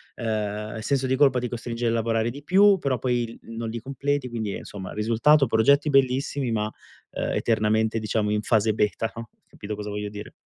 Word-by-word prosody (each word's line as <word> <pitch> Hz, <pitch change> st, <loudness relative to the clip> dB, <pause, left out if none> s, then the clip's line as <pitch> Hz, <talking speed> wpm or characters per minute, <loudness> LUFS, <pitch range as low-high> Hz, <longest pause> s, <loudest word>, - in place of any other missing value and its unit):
ehm, 110 Hz, -1 st, -3 dB
il 110 Hz, -, -6 dB
senso 135 Hz, +2 st, 0 dB
di 130 Hz, -, +1 dB
colpa 135 Hz, -2 st, +4 dB
ti 125 Hz, -, -3 dB
costringe 120 Hz, 0 st, -3 dB
a -, -, +2 dB
lavorare 115 Hz, 0 st, 0 dB
di 140 Hz, +3 st, -10 dB
più, 195 Hz, +4 st, +5 dB
però 135 Hz, -5 st, 0 dB
poi 120 Hz, 0 st, 0 dB
il 115 Hz, 0 st, -8 dB
non 115 Hz, 0 st, -5 dB
li 115 Hz, +1 st, -4 dB
completi, 140 Hz, +2 st, -2 dB
quindi 110 Hz, -4 st, -3 dB
insomma, 95 Hz, -2 st, -8 dB
risultato, 115 Hz, +7 st, +3 dB
progetti 140 Hz, +7 st, +3 dB
bellissimi, 135 Hz, -1 st, +1 dB
ma, 105 Hz, -2 st, 0 dB
uhm, 110 Hz, -, -9 dB
eternamente 110 Hz, 0 st, +1 dB
diciamo 110 Hz, -1 st, -1 dB
in 105 Hz, 0 st, +1 dB
fase 110 Hz, -1 st, +2 dB
beta 105 Hz, +2 st, 0 dB
no, 115 Hz, -1 st, -8 dB, 0.2 s
capito 105 Hz, +1 st, -7 dB
cosa 105 Hz, 0 st, -6 dB
voglio 105 Hz, 0 st, -4 dB
dire? 105 Hz, 0 st, -9 dB
115 Hz, 195 wpm, -25 LUFS, 110-130 Hz, 0.2 s, più